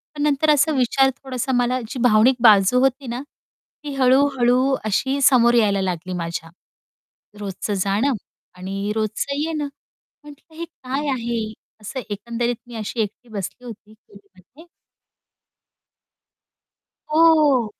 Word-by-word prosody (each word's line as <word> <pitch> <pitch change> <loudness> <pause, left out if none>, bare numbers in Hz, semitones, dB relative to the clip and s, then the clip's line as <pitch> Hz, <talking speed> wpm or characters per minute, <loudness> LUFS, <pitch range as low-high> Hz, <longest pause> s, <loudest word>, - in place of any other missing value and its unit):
पण 290 - -5
नंतर 300 +1 +2
असं 300 +1 +3
विचार 265 +2 +3
थोडासा 260 0 -3
मला 245 +1 +1
जी 255 - -6
भावनिक 240 +2 +5
बाजू 210 +1 +6
होती 265 +1 0
ना, 240 +2 -4 0.6
ती 290 - -5
हळू-हळू 260 0 +3
अशी 265 +7 0
समोर 240 -3 +5
यायला 205 -4 +3
लागली 185 0 -3
माझ्या. 170 -1 -5 0.9
रोजचं 205 +1 -4
जाणं 200 +8 +1 0.5
आणि 195 +3 -4
रोजचं 220 +6 -2
येणं, 305 -1 -2 0.6
म्हटलं, 295 +2 -16
"हे 335 - -4
काय 280 -2 -5
आहे?" 235 -3 -2 0.4
असं 260 +6 -6
एकंदरीत 235 +4 -3
मी 240 - -10
अशी 220 +2 -5
एकटी 215 +3 -6
बसली 215 +4 -6
होती. 215 -2 -11 0.2
रूममध्ये. 200 - -19 2.5
हो. 310 -6 +5
245 Hz, 120 wpm, -21 LUFS, 210-275 Hz, 2.5 s, बाजू